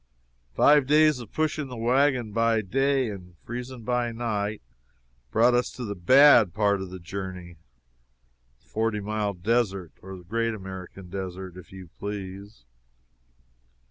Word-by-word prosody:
Five 145 - +5
days 150 -1 +4
of 120 -4 -10
pushing 155 -2 -1
the 125 -2 -8
wagon 125 0 +2
by 115 0 +2
day 135 +3 +1
and 90 -3 -11
freezing 125 0 -7
by 120 0 0
night 110 -3 -3 0.7
brought 120 - +4
us 125 0 +1
to 125 - -6
the 100 - -3
bad 120 - +6
part 100 -2 +2
of 95 - -6
the 95 - -8
journey 90 -1 -7 1.1
the - - -32
Forty 110 -1 -1
Mile 105 -1 -2
Desert, 100 -3 0
or 95 0 -9
the 90 - -13
Great 115 +4 -1
American 95 -2 -9
Desert, 95 -1 -6
if 90 - -13
you 95 -3 -11
please. 100 - -7
105 Hz, 140 wpm, -26 LUFS, 95-120 Hz, 1.1 s, bad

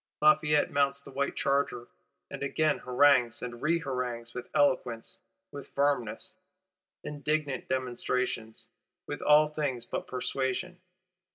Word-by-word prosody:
Lafayette 150 -1 +4
mounts 140 0 +2
the 140 - -13
white 140 +1 -1
charger; 140 -3 0 0.4
and - - -6
again 150 +2 +1
harangues 125 -2 +3
and 120 -1 -6
reharangues: 125 -7 -2
with 125 0 -7
eloquence, 125 -5 0 0.3
with 140 -1 -8
firmness, 140 -6 0 0.7
indignant 150 -2 -2
demonstration; 125 -3 -2 0.5
with - - -5
all 150 +1 +6
things 145 -6 -2
but - - -4
persuasion. 130 +7 -2
140 Hz, 110 wpm, -29 LUFS, 125-145 Hz, 0.7 s, all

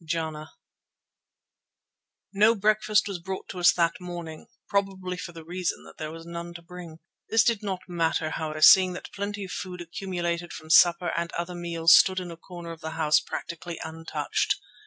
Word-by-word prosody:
JANA 160 -1 -4 1.8
No 215 +3 +5
breakfast 215 0 +2
was 195 -3 -4
brought 190 +2 -6
to 185 - -6
us 175 0 +7
that 170 +1 0
morning, 170 -3 -7 0.2
probably 195 -2 -1
for 180 -1 -7
the 165 -1 -11
reason 180 +1 -3
that - - -15
there 155 -1 -4
was 165 0 -10
none 170 0 -7
to 170 - -9
bring. 170 -2 -10 0.3
This 225 0 +5
did 230 -3 +1
not 190 -3 -3
matter, 165 -2 0
however, 155 -1 -4
seeing 185 -1 +8
that 180 - -9
plenty 200 0 -4
of 185 - -9
food 180 -1 -6
accumulated 175 -1 -4
from 155 0 -7
supper 175 +1 +6
and 170 0 -2
other 170 +1 -3
meals 170 -1 +3
stood 190 0 +5
in 180 -1 -6
a - - -8
corner 170 0 -9
of 165 -1 -10
the 160 - -5
house 150 -1 +4
practically 170 +2 -6
untouched. 160 0 -1
175 Hz, 180 wpm, -26 LUFS, 165-185 Hz, 1.8 s, seeing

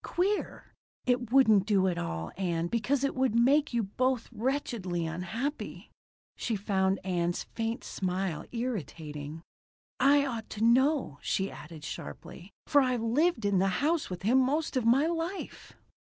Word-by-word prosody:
Queer. 390 +4 -2 0.3
It 245 -2 0
wouldn't 220 -7 +5
do 195 -3 +3
at 175 -2 -1
all, 80 - -4
Ann, 170 -3 -1
because 240 +8 0
it 275 - +1
would 260 -3 +1
make 280 +6 +4
you 235 -2 +1
both 250 +4 0
wretchedly 225 -8 -2
unhappy." 200 - -4 0.4
She 230 - -2
found 195 -1 +1
Ann's 175 -2 0
faint 225 +1 -4
smile 185 -3 -2
irritating. 160 - -5 0.6
"I 280 +2 +5
ought 230 -5 -4
to 215 - -1
know," 255 - +3
she 195 0 -1
added 155 -1 -10
sharply, 160 - -8
"for 290 -2 +5
I've 250 -3 0
lived 245 +1 +2
in 200 -2 +3
the 195 - +3 0.2
house 325 0 +1
with 180 0 -6
him 245 +6 +4
most 285 +5 0
of 250 -3 +1
my 265 +6 +5
life." 335 +3 -4
225 Hz, 150 wpm, -29 LUFS, 185-265 Hz, 0.6 s, wouldn't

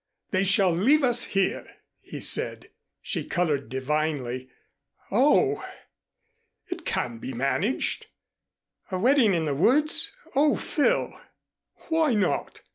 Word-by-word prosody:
They 190 -1 +2
shall 195 -1 +3
leave 260 - +3
us 245 -2 +2
here!" 195 -1 0 0.4
he - - -9
said. - - +1 0.3
She - - -2
colored 150 -8 -1
divinely. 130 -2 -2 0.6
"Oh!" 300 - +3 1.1
"It 355 -2 -6
can 120 -2 -2
be 130 - -6
managed." 140 - -1 0.8
"A 185 - -2
wedding 235 -1 +4
in 165 -1 0
the 145 - -1
woods! 275 - +2 0.2
Oh, 290 +2 +4
Phil!" 295 - -1 0.7
"Why 320 -6 +2
not? 205 - -1
195 Hz, 115 wpm, -26 LUFS, -, 1.1 s, wedding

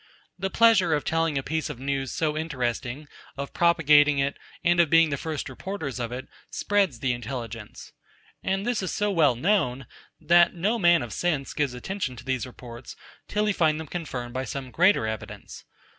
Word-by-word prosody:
The 195 +1 -1
pleasure 200 -7 +4
of 145 - -2
telling 165 -2 +1
a 135 - -1
piece 160 +2 -2
of 150 - -6
news 135 -1 -2
so 155 -2 -1
interesting, 135 -2 -3 0.3
of 140 0 -5
propagating 150 -4 +4
it, 140 +1 0 0.3
and 175 +1 +3
of 170 -3 +5
being 165 -1 +5
the - - +1
first 150 +1 -4
reporters 140 -1 -5
of 120 -1 -3
it, 130 +1 -6 0.2
spreads 195 - 0
the 130 -2 +1
intelligence. 120 -3 -7 0.5
And 195 +1 -1
this 240 -3 0
is 185 - -3
so 205 0 0
well 155 -9 +4
known, 135 - +1 0.3
that 175 0 +4
no 210 +7 0
man 175 - +5
of 120 - -7
sense 155 -6 -1
gives 140 -4 -1
attention 140 -1 -4
to 120 - -12
these 130 -3 -1
reports, 120 -1 -10 0.3
till 210 +1 0
he 210 - +2
find 155 -4 +2
them 160 - -5
confirmed 130 -7 -5
by 130 - -2
some 130 0 -6
greater 180 - +4
evidence. 110 -1 -7
150 Hz, 185 wpm, -26 LUFS, 130-175 Hz, 0.5 s, of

